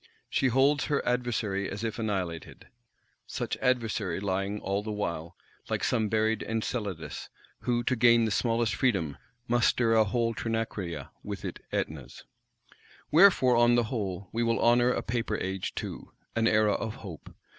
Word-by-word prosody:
She 135 - +2
holds 135 +4 +3
her 145 -2 0
adversary 115 -5 0
as 100 +3 -5
if 115 0 -3
annihilated; 95 -7 -3 0.6
such - - -3
adversary 115 -8 0
lying, 100 +1 -2
all 100 +1 -1
the 105 +1 -5
while, 85 -6 -4 0.3
like - - -1
some 110 -4 +1
buried 110 +1 +1
Enceladus; 110 -6 -4 0.3
who, 120 -1 0
to 130 - +1
gain 115 -1 +5
the 110 - -1
smallest 115 +3 +1
freedom, 95 - 0 0.3
must 120 0 +3
stir 115 -2 +2
a 110 -1 +6
whole 115 +2 0
Trinacria 115 -6 -3
with - - -6
it - - -5
Ætnas. 70 -5 -4 0.9
Wherefore, 155 -7 +6
on 120 0 +5
the 120 - +3
whole, 100 -4 -3
we 115 - -1
will 115 -1 +1
honour 120 +1 +4
a - - 0
Paper 115 0 -1
Age 95 0 -3
too; - - -6 0.2
an 115 0 +2
Era 110 -1 +4
of 110 0 -3
hope! 85 -6 -10
110 Hz, 155 wpm, -29 LUFS, 100-120 Hz, 0.9 s, a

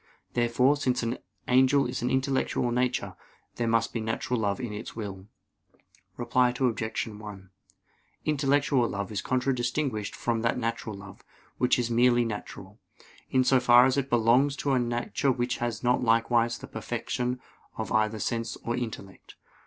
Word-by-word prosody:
Therefore, 125 +3 +3
since 125 -3 0
an 115 +2 -2 0.3
angel 130 +2 +4
is - - -3
an 125 - 0
intellectual 130 -2 0
nature, 125 +1 -1 0.4
there 120 - 0
must 115 0 +1
be 115 - -1
a - - -4
natural 115 +2 -2
love 100 +1 0
in 120 -4 -4
his 105 +3 -7
will. 100 -3 -6 0.9
Reply 125 +1 +2
Obj. 115 -3 -1
1: 105 -3 -10 0.8
Intellectual 140 -4 +2
love 100 0 -4
is 105 - -2
contradistinguished 125 -3 -1
from 115 -1 -1
that 115 0 +1
natural 115 -2 -3
love, 100 -1 -12 0.4
which 125 - +3
is 120 -1 -1
merely 120 0 +4
natural, 105 -2 -7 0.5
in 130 -1 +3
so 130 0 +4
far 125 0 +7
as 130 - +2
it 140 -1 -1
belongs 120 +4 +3
to 140 0 -1
a 130 - +3
nature 120 +3 0
which 125 +1 -1
has 120 -1 -3
not 125 +1 +2
likewise 115 0 +2
the - - -10
perfection 125 0 -3 0.4
of - - -4
either 110 0 +2
sense 115 +1 -2
or 120 - -1
intellect. 110 -6 -7
120 Hz, 160 wpm, -27 LUFS, 115-125 Hz, 0.9 s, far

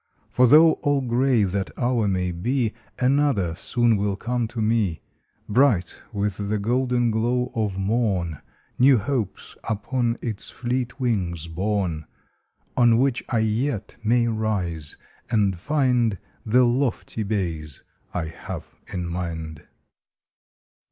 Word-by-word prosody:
For 125 0 +5
though 155 +5 +8
all 145 -1 +2
gray 125 -1 +2
that 95 0 -1
hour 120 -3 +1
may 90 -2 0
be 115 +6 -1 0.2
Another 130 - +2
soon 120 +5 +1
will 100 0 0
come 120 +3 -2
to 115 - -7
me 105 -6 +1 0.5
Bright 110 -6 +2
with 100 -1 -1
the 105 - +1
golden 120 +2 +1
glow 120 +3 0
of 105 -5 -1
morn, 95 - 0 0.4
New 130 +1 +6
Hopes 115 -2 -3
upon 115 +2 -1
its 110 -4 -4
fleet 125 +2 -3
wings 90 -10 -1
borne, 90 -2 -2 0.7
On 120 -2 +5
which 130 0 +1
I 120 - +1
yet 110 +1 -1
may 120 +2 +3
rise 100 -9 -2 0.3
and 105 -4 +2
find 125 - +1 0.3
The 125 +4 +5
lofty 120 -2 -1
bays 85 -9 -3 0.3
I 90 -2 -2
have 80 - -8 0.2
in 90 -1 -3
mind. 80 -3 -5
110 Hz, 125 wpm, -24 LUFS, 95-125 Hz, 0.7 s, though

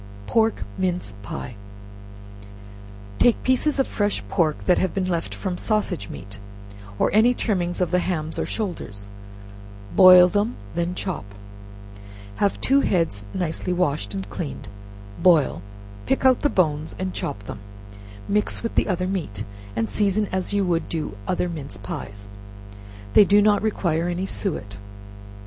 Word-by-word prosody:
Pork 225 - +1 0.2
Mince 180 - -1
Pies. 115 +4 -6 1.7
Take 240 - +4
pieces 260 +4 +2
of 270 - +3
fresh 205 -1 -1
pork 155 -5 0
that 180 - +4
have 185 -3 -1
been 190 -1 0
left 170 -2 -2
from 185 -3 -3
sausage 210 - -1
meat, 100 +1 -9 0.6
or - - +2
any 230 +4 +5
trimmings 175 -7 -1
of 180 - +1
the 180 - +3
hams 160 -3 -2
or - - 0
shoulders; 105 - -4 0.9
boil 180 -1 +9
them, 205 +5 0 0.2
then 170 +1 -1
chop. 185 - -3 1.1
Have 200 - +1
two 275 +1 +3
heads 165 - 0
nicely 180 0 -2
washed 140 - -1
and 95 0 -4
cleaned, 140 - -6 0.5
boil, 160 - +4 0.5
pick - - +1
out 260 -1 +6
the 290 - +3
bones 155 - 0
and 185 -1 -3
chop 100 - -4
them; 105 - -7 0.7
mix 210 +2 0
with 230 - -2
the - - +2
other 185 -2 0
meat, 165 - -3 0.3
and 115 0 0
season 210 0 +1
as 185 -1 -2
you 185 -5 +2
do 155 -11 -4
other 180 0 0
mince 145 - -6
pies, 100 0 -7 0.9
they - - +9
do 205 +1 +5
not 205 0 +4
require 175 -6 0
any 175 +2 -2
suet. 105 - -4
180 Hz, 145 wpm, -23 LUFS, 150-205 Hz, 1.7 s, boil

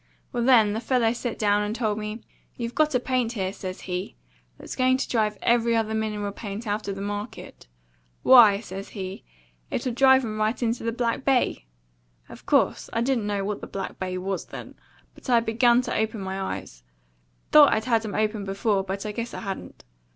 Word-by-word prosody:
"Well, 240 -1 0
then, 230 -5 +5
the 220 - -2
fellow 235 -1 +1
set 240 -1 -4
down 205 -1 +2
and 210 +1 -2
told 215 -3 -1
me, 210 +2 -5 0.3
'You've 235 0 -4
got 305 -3 +2
a - - +4
paint 250 -2 -1
here,' 190 -4 -2
says 185 -2 -7
he, 180 - -4 0.4
'that's - - -8
going 255 0 +3
to 265 - -2
drive 215 -3 0
every 235 0 +3
other 220 -1 0
mineral 210 -2 -2
paint 205 +2 -7
out 210 0 -2
of 200 - -2
the 195 - -5
market. 205 - -6 0.6
Why' 220 -6 +7
says 195 -2 -8
he, 190 -2 -7 0.5
'it'll 250 - -2
drive 265 +1 +5
'em 215 -1 -4
right 215 +3 0
into 230 0 -1
the 230 - 0
Back 235 +1 -1
Bay!' 255 - +1 0.6
Of - - -13
course, - - +2
I 230 - -1
didn't 235 -4 0
know 200 -1 -1
what 210 0 -3
the - - -7
Back 195 - -6
Bay 185 -1 -3
was 190 +1 -3
then, - - -9 0.4
but - - -12
I 240 -2 +5
begun 235 +2 +3
to - - -3
open 220 0 -1
my 190 0 -4 0.2
eyes; - - -12 0.7
thought 295 -2 +8
I'd 220 - 0
had 230 -3 +2
'em 210 -3 -5
open 215 -1 0
before, 195 +1 0
but 195 +2 -5
I 210 - -2
guess 230 +3 -5
I - - -6
hadn't. 195 -3 -7
220 Hz, 200 wpm, -25 LUFS, 200-240 Hz, 0.7 s, thought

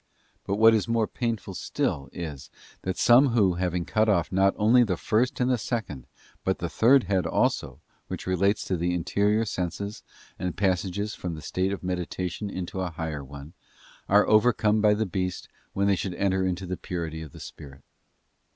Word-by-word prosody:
But 100 - 0
what 110 +2 +6
is 110 -1 +1
more 115 -1 +2
painful 115 -4 -3
still 70 -5 -2
is, 80 -6 -7 0.3
that 95 0 -3
some 125 +4 +6
who, 100 -6 +4
having 90 -1 -1
cut 110 0 +1
off 85 -6 +1
not 95 +1 +3
only 115 +4 +5
the 95 -6 -1
first 115 +8 0
and 125 -1 +2
second, 105 - -4 0.4
but 95 - 0
the 85 - -4
third 130 +8 +4
head 95 -1 0
also, - - 0 0.3
which - - -6
relates 100 +3 +1
to 95 - -1
the 90 +1 0
interior 105 +5 +1
senses 100 +2 -4 0.4
and 90 - -1
the - - -7
passage 95 +2 -1
from 90 -2 -5
the 75 - -9
state 95 +1 -1
of 100 - -5
meditation 90 +2 -3
into 95 0 -5
a 90 - -2
higher 80 -3 -5
one, 70 +3 -11 0.6
are 105 +1 +5
overcome 110 -1 +3
by 105 -1 +4
the 110 +1 0
beast, 90 -1 -3 0.3
when 100 - 0
'they 100 -1 +3
should 90 -1 -3
enter 95 0 +1
into 95 +1 -3
the 90 0 -4
purity 80 -3 -5
of 80 -3 -9
the - - -12
spirit. 70 -1 -11
95 Hz, 185 wpm, -26 LUFS, 90-105 Hz, 0.6 s, what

